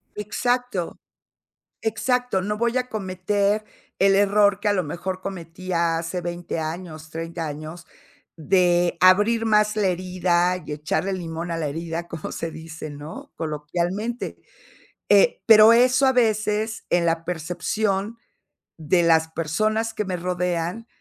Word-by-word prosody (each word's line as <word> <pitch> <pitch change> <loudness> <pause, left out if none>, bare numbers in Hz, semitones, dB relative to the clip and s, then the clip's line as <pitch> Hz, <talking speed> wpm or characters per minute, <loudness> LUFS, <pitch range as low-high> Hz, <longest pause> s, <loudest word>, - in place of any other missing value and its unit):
Exacto, 240 -1 -2 0.8
exacto, 240 -1 0
no 210 +2 -2
voy 235 +2 0
a 250 0 -2
cometer 200 +1 -1 0.3
el 195 0 +4
error 205 0 +3
que 210 - 0
a - - +4
lo 185 -3 +1
mejor 185 +4 -5
cometía 170 -2 -2
hace 170 +2 -3
20 175 -1 -4
años, 160 -1 -6
30 165 0 -5
años 155 +4 -7 0.5
de 175 +1 +2
abrir 210 +5 +5
más 210 0 +3
la 200 -3 +2
herida 180 0 +1
y - - -6
echarle 155 +6 -1
limón 170 -1 -4
a 165 - -1
la 155 -3 -2
herida, 165 +3 -4
como 165 -2 -6
se 165 - -4
dice, 160 -1 -8
¿no?, 145 +2 -9
coloquialmente, 175 +9 -3 0.7
eh, - - +4
pero 220 -1 +8
eso, 250 +3 +4
a 265 - +5
veces, 220 -2 0
en 175 -1 +2
la 165 0 0
percepción 195 +5 -2 0.6
de 165 +3 +2
las 160 -1 +3
personas 215 +8 -1
que 210 - -2
me 185 -1 -3
rodean, 180 +4 -2
185 Hz, 135 wpm, -23 LUFS, 165-210 Hz, 0.8 s, pero